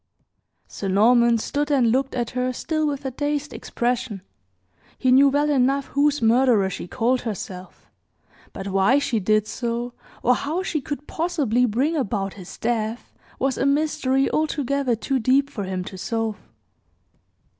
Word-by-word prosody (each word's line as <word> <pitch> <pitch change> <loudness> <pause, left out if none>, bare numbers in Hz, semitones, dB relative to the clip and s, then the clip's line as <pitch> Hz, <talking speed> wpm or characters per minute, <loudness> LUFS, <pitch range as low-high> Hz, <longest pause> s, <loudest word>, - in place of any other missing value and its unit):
Sir 200 - -6
Norman 235 +4 +4
stood 290 +6 -2
and 255 -6 +3
looked 265 +2 0
at 240 -2 -2
her 255 0 -1
still 310 +4 -1
with 280 -1 -3
a 265 - -2
dazed 290 +2 -2
expression. 240 -5 -2 0.7
He 255 - +2
knew 275 +2 +7
well 290 +2 +1
enough 275 0 +1
whose 290 -1 +1
murderer 225 -4 +4
she 180 - -6
called 250 +5 0
herself; 190 -4 -7 0.6
but 195 +1 -6
why 195 +7 +3
she 255 -5 0
did 215 +2 +2
so, 235 +2 -3 0.3
or 250 - +5
how 315 +8 -2
she 315 -5 -2
could 290 +1 -6
possibly 290 -9 0
bring 265 +9 0
about 200 -8 -2
his 185 -3 -11
death, 225 0 -2 0.2
was 265 0 -1
a - - +1
mystery 280 -2 +1
altogether 280 -4 0
too 265 +4 -1
deep 270 +4 +2
for 205 -7 -4
him 185 -1 -3
to 185 0 -9
solve. 225 0 -3
250 Hz, 155 wpm, -23 LUFS, 225-280 Hz, 0.7 s, knew